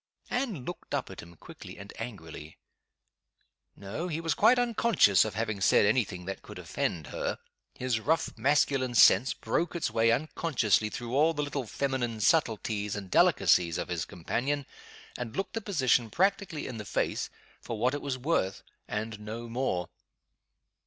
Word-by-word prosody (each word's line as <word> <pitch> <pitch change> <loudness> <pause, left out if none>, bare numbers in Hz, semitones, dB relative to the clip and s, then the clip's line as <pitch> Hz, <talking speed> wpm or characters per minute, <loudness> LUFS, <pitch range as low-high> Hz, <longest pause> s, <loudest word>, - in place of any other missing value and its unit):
Anne 230 - -2
looked 175 - -5
up - - -3
at - - -10
him, 85 +1 -14
quickly - - -11
and 100 0 -10
angrily. 80 -9 -8 1.2
No! 100 - -5
he 160 -2 -3
was 165 -2 0
quite 250 - +5
unconscious 230 - +4
of 110 -2 -4
having 110 -2 -2
said 100 - +5
any 115 +4 +4
thing 90 -3 -9
that 95 +1 -5
could - - -11
offend 80 -4 -3
her. - - -3 0.4
His 125 -3 -1
rough 160 +7 0
masculine 130 0 +2
sense 110 +3 +6
broke 170 +1 -1
its 165 -9 -1
way 115 +1 +3
unconsciously 120 - +1
through 120 +2 -6
all 160 +3 +4
the 150 - -1
little 140 -4 -3
feminine 125 -3 -2
subtleties 110 -6 +1
and 100 -3 -7
delicacies 85 -2 +4
of - - -4
his - - -2
companion, 135 - -2 0.5
and 120 -2 -5
looked 195 - -2
the 225 - -2
position 130 - +2
practically 195 - 0
in 125 - -6
the 105 - -6
face - - -1 0.3
for 115 - -5
what 125 +5 +1
it 145 - -3
was 135 -2 -3
worth, 125 - -1 0.2
and 110 0 -4
no 110 +3 -6
more. 115 -7 -1
120 Hz, 165 wpm, -29 LUFS, 105-150 Hz, 1.2 s, sense